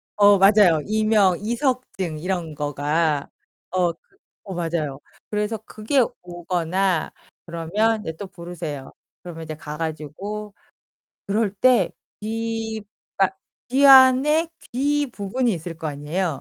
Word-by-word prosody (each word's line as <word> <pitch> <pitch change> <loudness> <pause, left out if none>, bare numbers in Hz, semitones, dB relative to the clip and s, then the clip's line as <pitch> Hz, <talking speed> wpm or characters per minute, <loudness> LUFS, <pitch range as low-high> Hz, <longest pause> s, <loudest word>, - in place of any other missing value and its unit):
어, 205 -1 +6
맞아요. 195 -4 +6
이명, 215 -4 +3
이석증 230 - -2
이런 175 -2 -3
거가. 145 +1 0 0.4
어, 180 -2 +2
그 165 - -18 0.4
어, 190 - -7
맞아요. 165 -5 -2 0.3
그래서 210 +1 -1
그게 225 +6 +1 0.2
오거나 175 0 -1 0.3
그러면 200 +7 0
이제 160 - -5
또 200 - -6
부르세요. 170 -6 -7 0.3
그러면 165 -2 -8
이제 155 -1 -6
가 150 0 -8
가지고 165 +7 -5 0.7
그럴 205 0 0
때 250 +4 +4 0.3
귀 225 0 -3 0.3
그러니까 190 -1 +2 0.3
귀 275 +3 +4
안에 270 +5 +7 0.2
귀 290 +3 +1
부분이 230 +2 -1
있을 165 0 -6
거 160 0 -5
아니에요. 150 +6 -2
190 Hz, 250 characters per minute, -23 LUFS, 165-220 Hz, 0.7 s, 안에